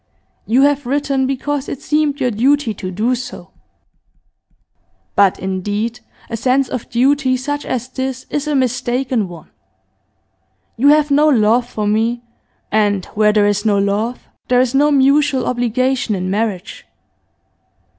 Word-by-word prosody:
'You 250 Hz, +5 st, +3 dB
have 285 Hz, -2 st, +1 dB
written 275 Hz, -1 st, 0 dB
because 275 Hz, +1 st, -3 dB
it 270 Hz, -, -5 dB
seemed 300 Hz, -1 st, 0 dB
your 250 Hz, -2 st, +1 dB
duty 255 Hz, +2 st, +1 dB
to 185 Hz, -, -6 dB
do 215 Hz, +7 st, 0 dB
so. 250 Hz, 0 st, -7 dB, 1.6 s
But, 200 Hz, -2 st, +4 dB
indeed, 205 Hz, +5 st, -3 dB, 0.3 s
a -, -, -4 dB
sense 255 Hz, +3 st, +1 dB
of 250 Hz, -, -5 dB
duty 260 Hz, +2 st, +2 dB
such 290 Hz, +3 st, -4 dB
as 250 Hz, -1 st, -2 dB
this 260 Hz, 0 st, -5 dB
is 295 Hz, 0 st, -2 dB
a 300 Hz, -, 0 dB
mistaken 250 Hz, -3 st, 0 dB
one. 170 Hz, -3 st, -13 dB, 1.2 s
You 265 Hz, +5 st, +2 dB
have 300 Hz, 0 st, +4 dB
no 295 Hz, +2 st, +4 dB
love 240 Hz, -2 st, +3 dB
for 210 Hz, -3 st, -3 dB
me, 225 Hz, +3 st, 0 dB, 0.5 s
and 205 Hz, -3 st, +1 dB
where 210 Hz, 0 st, +3 dB
there 210 Hz, -1 st, +3 dB
is 205 Hz, 0 st, +1 dB
no 210 Hz, -2 st, +2 dB
love 205 Hz, +5 st, -1 dB, 0.2 s
there 250 Hz, 0 st, +3 dB
is 255 Hz, 0 st, +1 dB
no 290 Hz, +2 st, +4 dB
mutual 275 Hz, -1 st, +3 dB
obligation 250 Hz, 0 st, 0 dB
in 185 Hz, 0 st, -3 dB
marriage. 205 Hz, -2 st, -3 dB
250 Hz, 145 wpm, -17 LUFS, 215-275 Hz, 1.6 s, But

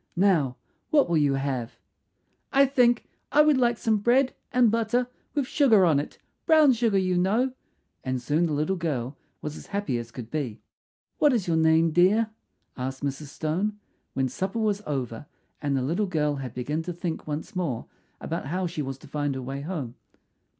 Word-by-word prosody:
Now 170 Hz, -10 st, +3 dB, 0.3 s
what 290 Hz, -2 st, +4 dB
will 170 Hz, -1 st, +2 dB
you 140 Hz, -2 st, +2 dB
have?" 135 Hz, -4 st, -2 dB, 0.8 s
"I 275 Hz, 0 st, +6 dB
think 245 Hz, -3 st, +3 dB, 0.3 s
I 300 Hz, -, +6 dB
would 300 Hz, -3 st, +4 dB
like 240 Hz, -2 st, +2 dB
some 220 Hz, -2 st, +1 dB
bread 250 Hz, +5 st, +3 dB, 0.2 s
and 245 Hz, -3 st, +4 dB
butter 230 Hz, +2 st, +1 dB, 0.3 s
with 285 Hz, -3 st, +1 dB
sugar 235 Hz, -9 st, +4 dB
on 155 Hz, -5 st, +4 dB
it 145 Hz, -, -6 dB, 0.3 s
brown 310 Hz, -5 st, +6 dB
sugar, 230 Hz, -4 st, +1 dB
you 185 Hz, -2 st, +2 dB
know;" 220 Hz, +8 st, +2 dB, 0.5 s
and 130 Hz, -1 st, -1 dB
soon 150 Hz, +7 st, +1 dB
the 155 Hz, -, -2 dB
little 155 Hz, +6 st, 0 dB
girl 140 Hz, -6 st, -2 dB, 0.3 s
was 150 Hz, 0 st, -4 dB
as -, -, -11 dB
happy 200 Hz, -12 st, -2 dB
as 120 Hz, 0 st, -7 dB
could 120 Hz, -1 st, -9 dB
be. 135 Hz, -8 st, -3 dB, 0.6 s
"What 295 Hz, -3 st, +5 dB
is 220 Hz, -7 st, 0 dB
your 165 Hz, -, +2 dB
name, 160 Hz, +1 st, +4 dB
dear?" 200 Hz, +7 st, +4 dB, 0.4 s
asked 130 Hz, +2 st, -5 dB
Mrs. 140 Hz, +1 st, -3 dB
Stone, 175 Hz, +9 st, -2 dB, 0.4 s
when 135 Hz, -1 st, +1 dB
supper 190 Hz, -, -3 dB
was 210 Hz, -2 st, +1 dB
over 130 Hz, -3 st, -3 dB, 0.3 s
and 140 Hz, -2 st, 0 dB
the 130 Hz, -, 0 dB
little 175 Hz, +10 st, 0 dB
girl 150 Hz, -5 st, 0 dB
had 130 Hz, -3 st, -6 dB
begun 145 Hz, +6 st, -2 dB
to 175 Hz, +2 st, -5 dB
think 170 Hz, -2 st, -4 dB
once 150 Hz, +5 st, -5 dB
more 160 Hz, -11 st, -2 dB, 0.3 s
about -, -, -4 dB
how 180 Hz, +5 st, -1 dB
she 170 Hz, -3 st, -3 dB
was 135 Hz, -2 st, -4 dB
to 150 Hz, -, -15 dB
find 145 Hz, -1 st, -2 dB
her 130 Hz, -, -4 dB
way 135 Hz, +2 st, -5 dB
home. 145 Hz, -7 st, -4 dB
165 Hz, 185 wpm, -26 LUFS, 140-215 Hz, 0.8 s, I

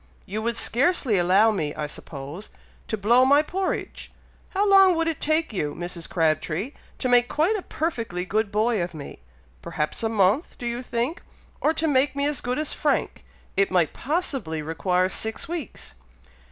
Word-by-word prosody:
you 205 Hz, +2 st, -4 dB
would 235 Hz, +1 st, -1 dB
scarcely 250 Hz, -, +2 dB
allow 190 Hz, +6 st, +5 dB
me, 155 Hz, -8 st, -2 dB
I 150 Hz, -, -3 dB
suppose, 145 Hz, +5 st, -8 dB, 0.4 s
to 220 Hz, -, -2 dB
blow 235 Hz, +5 st, +4 dB
my 285 Hz, +3 st, +5 dB
porridge! 375 Hz, +4 st, -3 dB, 0.4 s
how 400 Hz, +2 st, +1 dB
long 390 Hz, -2 st, +7 dB
would 330 Hz, 0 st, 0 dB
it 325 Hz, -3 st, -2 dB
take 310 Hz, -3 st, +1 dB
you, 150 Hz, -7 st, -2 dB
Mrs. 175 Hz, -1 st, -5 dB
Crabtree, 165 Hz, -, 0 dB, 0.3 s
to 255 Hz, -, -2 dB
make 245 Hz, -1 st, +4 dB
quite 330 Hz, +9 st, +2 dB
a 415 Hz, -, -2 dB
perfectly 230 Hz, -, -3 dB
good 215 Hz, +2 st, 0 dB
boy 215 Hz, 0 st, +1 dB
of 170 Hz, -1 st, -4 dB
me? 145 Hz, -, -9 dB, 0.4 s
Perhaps 150 Hz, -, -3 dB
a 225 Hz, -, 0 dB
month, 215 Hz, -, +1 dB
do 245 Hz, -, -7 dB
you 240 Hz, +1 st, -2 dB
think? 250 Hz, +5 st, -2 dB, 0.4 s
or 310 Hz, -, +3 dB
to 320 Hz, +1 st, 0 dB
make 280 Hz, -1 st, +2 dB
me 280 Hz, 0 st, 0 dB
as 295 Hz, -1 st, 0 dB
good 250 Hz, +1 st, -2 dB
as 305 Hz, 0 st, -2 dB
Frank, -, -, -1 dB, 0.3 s
it 195 Hz, 0 st, +3 dB
might 175 Hz, -4 st, +2 dB
possibly 265 Hz, -, -2 dB
require 180 Hz, +4 st, +1 dB
six 220 Hz, -, -4 dB
weeks." 335 Hz, -3 st, -6 dB
230 Hz, 175 wpm, -25 LUFS, 180-295 Hz, 0.4 s, long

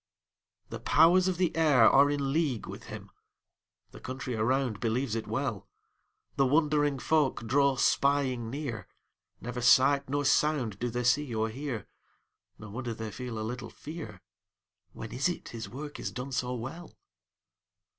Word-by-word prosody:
The -, -, -6 dB
powers 175 Hz, +4 st, +5 dB
of 185 Hz, -2 st, 0 dB
the 180 Hz, -2 st, 0 dB
air 145 Hz, -8 st, +5 dB
are 140 Hz, +4 st, +6 dB
in 140 Hz, -1 st, -1 dB
league 145 Hz, -8 st, 0 dB
with -, -, -9 dB
him; -, -, -9 dB, 0.8 s
The -, -, -12 dB
country 130 Hz, 0 st, -5 dB
around 115 Hz, 0 st, 0 dB
believes 120 Hz, +1 st, -1 dB
it 115 Hz, -1 st, -3 dB
well; 110 Hz, -4 st, -3 dB, 0.7 s
The 135 Hz, -, +4 dB
wondering 145 Hz, 0 st, +2 dB
folk 145 Hz, -4 st, +1 dB
draw 140 Hz, +3 st, +3 dB
spying 130 Hz, -3 st, +1 dB
near; 130 Hz, -5 st, -5 dB, 0.5 s
Never 125 Hz, +3 st, -5 dB
sight 135 Hz, +3 st, +5 dB
nor 145 Hz, +1 st, -1 dB
sound 135 Hz, -8 st, +1 dB
do 120 Hz, -, -1 dB
they 120 Hz, +1 st, -2 dB
see 125 Hz, 0 st, +1 dB
or 110 Hz, 0 st, 0 dB
hear; 130 Hz, -1 st, -5 dB, 0.7 s
No 105 Hz, -1 st, -10 dB
wonder 120 Hz, 0 st, -4 dB
they 110 Hz, -1 st, -6 dB
feel 125 Hz, 0 st, -6 dB
a -, -, -3 dB
little 125 Hz, +2 st, -6 dB
fear; 160 Hz, +1 st, -9 dB, 0.7 s
When 115 Hz, -, -8 dB
is 135 Hz, +7 st, 0 dB
it 175 Hz, -, -6 dB
his 115 Hz, -1 st, -7 dB
work 145 Hz, +3 st, -8 dB
is -, -, -3 dB
done 125 Hz, +2 st, -6 dB
so 125 Hz, 0 st, -2 dB
well? 135 Hz, +9 st, -8 dB
130 Hz, 155 wpm, -29 LUFS, 115-145 Hz, 0.8 s, are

